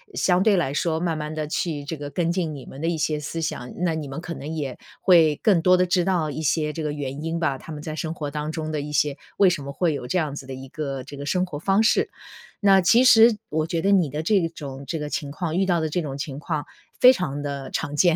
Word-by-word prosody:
相 180 0 +3
对 205 -3 +4
来 140 -6 0
说， 160 +2 0
慢 165 -2 -1
慢 150 0 -4
地 155 -1 -3
去 150 -2 -2
这 155 - -4
个 145 0 -6
跟 165 +4 0
进 170 -4 -1
你 135 - -9
们 135 - -10
的 165 - -1
一 170 - -1
些 155 0 0
思 160 +3 -4
想， 125 -5 -4
那 175 -2 0
你 155 -2 -4
们 135 +3 -5
可 175 - -5
能 155 +3 -6
也 140 -5 -4 0.2
会 165 -5 +5
更 195 -6 +4
多 180 +2 +5
的 180 - +3
知 180 0 +2
道 175 -5 +1
一 155 - -5
些 150 0 0
这 160 - -4
个 150 - -1
原 145 0 -5
因 165 +1 -2
吧， 140 -5 0
他 160 - -11
们 150 - -6
在 155 0 -5
生 160 +1 -3
活 150 -3 -4
当 150 +1 -3
中 155 -1 -4
的 150 - -1
一 150 +1 -6
些 145 -1 +1 0.2
为 195 - +6
什 170 -5 -2
么 140 - -6
会 165 +2 +1
有 140 - -5
这 160 - 0
样 150 -4 -2
子 140 - -7
的 135 - -6
一 130 +1 -8
个 140 -3 -4
这 145 - -9
个 140 - -6
生 180 +5 +1
活 160 -5 -6
方 195 +5 +2
式。 225 - +3 0.5
那 195 -2 +6
其 225 +8 +5
实 230 -3 +7
我 155 +1 -1
觉 165 0 -1
得 195 - +2
你 180 -7 +4
的 150 +3 -4
这 185 -1 +2
种 140 -4 -8
这 165 - -2
个 150 0 -4
情 145 -2 -3
况 160 +1 -3
遇 190 - +3
到 175 -3 +1
的 160 - -1
这 175 +4 -1
种 140 -4 -5
情 140 -1 -5
况 155 0 -3 0.3
非 250 - +9
常 145 - -3
地 140 -2 -5
常 145 - -3
见。 170 +2 +4
155 Hz, 300 characters per minute, -24 LUFS, 145-175 Hz, 0.5 s, 非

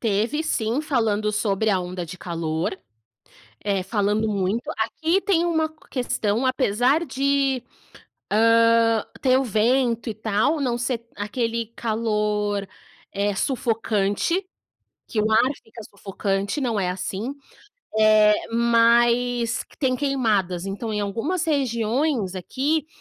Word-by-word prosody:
Teve 225 +7 0
sim, 235 -3 0
falando 225 -8 0
sobre 210 0 0
a 195 - +2
onda 180 -1 -5
de 180 +3 -8
calor, 165 0 -3 0.9
eh, 195 -2 0
falando 210 +2 0
muito. 205 +3 -1
Aqui 320 - 0
tem 370 -4 +1
uma 320 -2 +1 0.2
questão, 245 -3 -1
apesar 255 +4 +2
de, 275 -1 +1 0.7
hã, 230 0 +4 0.2
ter 260 -1 +4
o 270 - 0
vento 235 +2 +1
e 220 - -3
tal, 220 +8 0
não 245 -3 0
ser 240 -1 -3
aquele 230 +2 -2
calor, 210 -3 -1 0.5
eh, 200 +1 0
sufocante, 225 - 0 0.6
que 220 - -2
o 215 +1 +1
ar 235 +4 +4
fica 225 0 -12
sufocante, 200 +3 -3
não 235 -5 0
é 185 -2 0
assim, 195 +7 -4 0.7
eh, 215 -1 +6 0.2
mas 235 +1 +3
que - - -23
tem 260 -3 +1
queimadas. 215 -10 0
Então, 205 +3 -4
em 210 - -1
algumas 235 - -2
regiões 245 - 0
aqui, 275 - -1
225 Hz, 125 wpm, -23 LUFS, 205-255 Hz, 0.9 s, eh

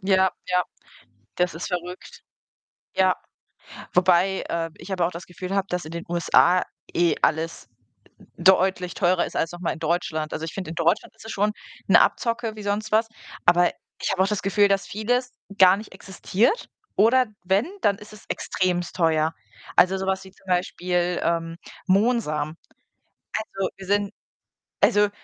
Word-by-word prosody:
Ja, 190 -1 +3 0.2
ja, 180 0 +3 0.7
das 180 -2 +1
ist 165 - -5
verrückt. 180 -1 -6 0.7
Ja, 185 -1 +4 0.8
wobei, 185 +1 +3
äh, 165 -1 -2
ich 190 +3 -8
aber 175 -3 +1
auch - - -3
das 175 +2 -8
Gefühl 185 +2 -6
habe, 195 0 +1
dass 180 0 -2
in 155 - -8
den 170 0 -5
USA 175 +1 +4 0.3
eh 170 -1 +3
alles 160 +1 0 0.7
deutlich 185 0 +3
teurer 180 -1 +2
ist - - -9
als 165 - 0
noch 175 - -9
mal 175 - -1
in 160 - -11
Deutschland. 160 -2 -1
Also, 160 - -3
ich 160 - -7
finde, 185 -5 -5
in 170 - -7
Deutschland 165 -1 +1
ist - - -16
es 220 - -6
schon 210 +2 +1 0.4
'ne - - +7
Abzocke 230 -2 0
wie 210 - -8
sonst 210 +2 -2
was, 220 +1 +3 0.4
aber 175 0 +5 0.3
ich - - 0
habe 190 0 +2
auch 190 - +1
das 210 -1 -1
Gefühl, 200 +1 +3
dass 195 -2 0
vieles 245 +6 -1 0.3
gar 190 0 +7
nicht 215 -2 -10
existiert 195 - 0 0.3
oder 245 +4 +4 0.2
wenn, 190 +5 +2 0.2
dann 200 -7 +2
ist 210 0 -13
es 210 - -14
extrem 175 -2 -1
teuer. 160 -2 +2 0.4
Also, 190 +1 +5
so 190 - -3
was 190 0 0
wie 190 - -13
zum 195 - -26
Beispiel, 180 -1 0
ähm, 165 0 -1 0.3
Mohnsamen. 185 -7 +1 0.8
Also 195 -3 -3
wir 195 - -9
sind 205 0 +1 0.7
also 205 0 +4
185 Hz, 170 wpm, -24 LUFS, 175-200 Hz, 0.8 s, ne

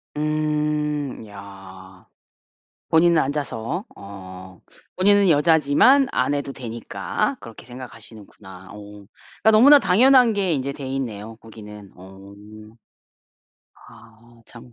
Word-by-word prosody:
음 150 -3 -2
야. 95 -2 -14 0.8
본인은 170 +1 +3
앉아서 140 - -4
어. 95 -2 -12 0.4
본인은 200 +1 +4
여자지만 160 - +3
안 130 +3 -1
해도 140 -1 -5
되니까 120 -4 -5
그렇게 115 0 -13
생각하시는구나. 110 -6 -13
어. - - -12
그니깐 105 - -4
너무나 280 +7 +7
당연한 250 +2 +4
게 195 -4 -1
인제 140 -1 -3
돼있네요 125 -6 -6
거기는. 105 -3 -13
어. 95 +2 -15 1.6
아 115 +1 -20
참 120 0 -15
125 Hz, 225 characters per minute, -21 LUFS, 105-150 Hz, 1.6 s, 너무나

